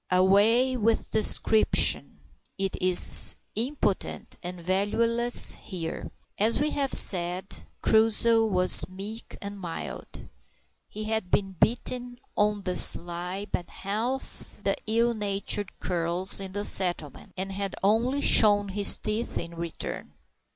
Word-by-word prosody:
Away 205 +8 +2
with 225 0 -2
description 220 0 +2 0.4
it 195 -1 -3
is 180 -1 +6 0.2
impotent 235 -3 -4
and 180 0 -8
valueless 230 +7 +1
here! 170 -4 -8 0.3
As 220 +3 +1
we 300 +1 -1
have 275 -2 -3
said, 180 +1 +2 0.2
Crusoe 225 +1 +3
was 185 -3 +4
meek 200 +5 -10
and 200 0 -9
mild. 170 -3 -9 0.6
He 215 - -8
had 220 -3 -4
been 195 0 -1
bitten, 245 +5 -3 0.2
on 210 -1 -1
the 180 -1 -3
sly, 175 +3 +2
by - - -3
half 225 +7 -7
the - - -1
ill 230 +2 0
natured 205 -1 -4
curs 175 +2 +2
in 190 -1 -8
the 205 +1 -3
settlement, 175 -6 0
and 190 +1 -5
had 195 0 -6
only 235 +7 0
shown 205 -5 +4
his 200 +1 +5
teeth 215 +3 -5
in 170 0 -6
return. 170 -1 -8
200 Hz, 125 wpm, -25 LUFS, 185-225 Hz, 0.6 s, is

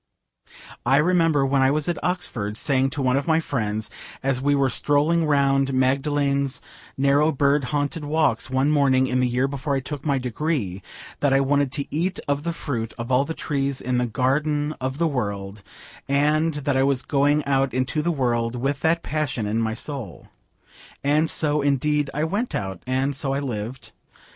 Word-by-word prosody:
I 135 +3 +3
remember 165 -3 +3
when 135 0 +2
I 130 - +4
was 150 +2 0
at 175 -2 -2
Oxford 110 - -2
saying 135 0 +1
to 140 0 -3
one 130 +1 +2
of 140 - -2
my 160 0 +3
friends 110 -8 -2 0.3
as 135 -1 0
we 145 +1 +2
were 140 -1 +3
strolling 150 +5 +2
round 135 -2 +2
Magdalen's 140 +1 +1 0.4
narrow 140 +3 +3
bird 140 -1 +2
haunted 145 +4 -2
walks 150 -2 +1
one 130 +3 +2
morning 135 -3 +3
in 130 0 0
the 125 - +2
year 125 +2 +1
before 140 +1 -2
I - - +1
took 140 +1 -6
my 140 -3 +1
degree, 125 - -2 0.4
that 145 -2 +2
I 135 - +5
wanted 140 0 +1
to 140 -1 -3
eat 180 +4 -1
of 145 0 0
the 170 +2 -2
fruit 120 -9 -4
of 120 +2 -5
all 130 +2 +3
the 160 - -5
trees 140 -2 -1
in 125 -1 -1
the 125 - 0
garden 145 +5 0
of 130 +1 -2
the 165 +1 +2
world, 100 -7 -3 0.5
and 150 +3 +2
that 145 -1 -1
I 130 - +3
was 135 -1 +1
going 145 +1 +2
out 135 -1 +1
into 130 +4 -1
the 170 - -1
world 120 -6 0
with 135 +3 -1
that 165 +1 +1
passion 140 -7 -2
in 110 +2 0
my 110 -1 -1
soul. 125 - -7 0.7
And 150 +3 +2
so, 150 -1 +1
indeed, 145 +1 +1
I 150 - -2
went 205 +9 -1
out, 95 -2 -4
and 135 +2 0
so 140 -1 -1
I - - 0
lived. 125 -2 -5
140 Hz, 185 wpm, -23 LUFS, 130-150 Hz, 0.7 s, I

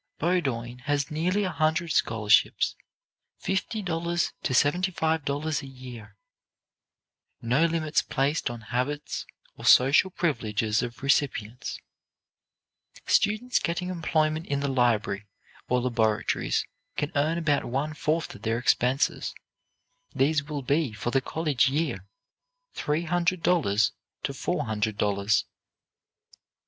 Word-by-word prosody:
Bowdoin 135 -9 -1
has 145 -1 0
nearly 180 +7 +1
a 185 - -1
hundred 160 +1 +1
scholarships, 105 -6 +3 0.6
fifty 200 +3 -2
dollars 170 -1 -1
to - - -2
seventy 145 +9 +3
five 160 -3 0
dollars 145 +1 -1
a 140 - -9
year: 125 -5 -11 1.2
"no 125 +8 +2
limits 160 -2 +1
placed 140 +2 0
on 120 -1 -7
habits 145 +4 -2 0.3
or - - -11
social 135 +9 +6
privileges 110 - 0
of 120 +1 -6
recipients;" 130 -4 0 1.3
students 225 +4 +2
getting 180 +2 -2
employment 160 -2 0
in 140 -1 0
the 140 - 0
library 110 -6 +1 0.4
or 125 - +3
laboratories 115 -4 0 0.3
can 145 - -1
earn 155 +3 +1
about 150 -4 +1
one 140 +5 -2
fourth 155 +2 -1
of - - -13
their 115 0 0
expenses; 125 +2 +1 0.8
these 150 +2 +2
will 145 -1 -5
be, 140 0 +1
for 110 +3 -3
the 135 - +2
college 145 -3 +1
year, 135 - -2 0.7
three 150 +3 -1
hundred 175 +1 0
dollars 110 - +3 0.3
to - - -2
four - - -2
hundred 110 -1 -1
dollars. 100 -1 +1
145 Hz, 120 wpm, -27 LUFS, 120-165 Hz, 1.3 s, social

